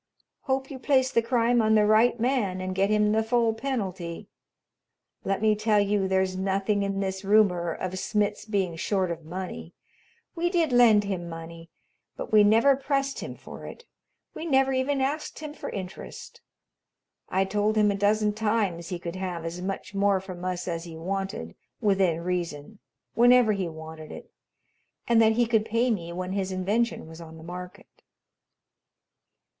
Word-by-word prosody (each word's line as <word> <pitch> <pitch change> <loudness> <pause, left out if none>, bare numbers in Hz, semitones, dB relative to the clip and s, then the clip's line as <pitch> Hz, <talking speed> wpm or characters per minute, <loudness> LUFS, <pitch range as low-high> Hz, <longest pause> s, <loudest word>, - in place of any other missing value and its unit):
Hope 265 0 -1
you 265 - -7
place 260 -1 +2
the 230 - +3
crime 235 0 +2
on 220 0 +3
the 210 -1 +5
right 220 +3 +4
man 225 -7 0
and 185 0 -3
get 195 +2 +1
him 210 0 +3
the 220 +1 +3
full 230 0 +2
penalty. 195 -9 -4 0.9
Let 195 +2 -1
me 215 -1 +5
tell 215 0 +2
you 200 -1 +1
there's 190 0 +1
nothing 195 +2 0
in 195 0 -1
this 190 0 -3
rumor 195 -4 +3
of 185 +2 -4
Smitz 210 0 -1
being 195 -6 -1
short 190 +1 0
of 165 -1 -6
money. 180 0 -7 0.6
We 345 0 0
did 340 -5 +1
lend 235 -4 +6
him 185 -4 -4
money, 165 0 -9 0.5
but - - -6
we 210 -1 +7
never 225 +7 +5
pressed 275 0 -1
him - - -6
for - - -10
it. 475 - -11 0.5
We - - -7
never 270 -4 +2
even 265 +1 0
asked 290 +3 -2
him 305 -1 -7
for - - -7
interest. 190 -1 -8 0.9
I 190 +1 +1
told 210 +2 0
him 210 -1 +4
a - - -1
dozen 210 +1 +2
times 210 -6 -1
he 180 - -3
could 170 +1 -6
have 180 -3 -4
as 170 +2 -5
much 190 +1 -5
more 200 -1 +2
from 185 -2 -9
us 180 -1 -3
as 165 -1 -3
he 165 -2 -9
wanted, 190 - -4 0.3
within 190 -5 +2
reason, 175 +1 -4 0.3
whenever 245 -1 +5
he 195 -4 -1
wanted 160 -1 -9
it, - - -10 0.8
and 235 -1 +5
that 220 0 +5
he 240 +1 +2
could 225 -2 +2
pay 230 +3 +1
me 170 -6 -3
when 180 +1 -4
his 190 -1 -2
invention 205 +5 -1
was 160 +1 -11
on 160 -1 -11
the 160 - -12
market." 180 +1 -10
200 Hz, 170 wpm, -26 LUFS, 180-230 Hz, 0.9 s, we